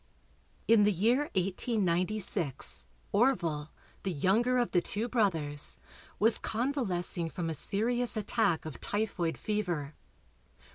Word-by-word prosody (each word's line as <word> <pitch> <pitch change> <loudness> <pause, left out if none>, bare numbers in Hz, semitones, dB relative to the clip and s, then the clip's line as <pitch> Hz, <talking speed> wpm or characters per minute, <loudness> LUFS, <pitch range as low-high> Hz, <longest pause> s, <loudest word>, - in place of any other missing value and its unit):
In 225 -2 +6
the 205 0 +4
year 235 - +2
1896 185 - 0 0.2
Orville, 170 - +1 0.3
the 195 - -2
younger 220 - +2
of 240 -1 +1
the 175 - +3
two 215 +6 -1
brothers, 165 -12 0 0.4
was 220 +2 +4
convalescing 210 - -1
from 165 -1 -3
a - - -2
serious 235 +8 0
attack 210 -6 0
of 155 -6 -8
typhoid 200 -6 -2
fever. 175 -9 -2
195 Hz, 110 wpm, -30 LUFS, 170-225 Hz, 0.4 s, In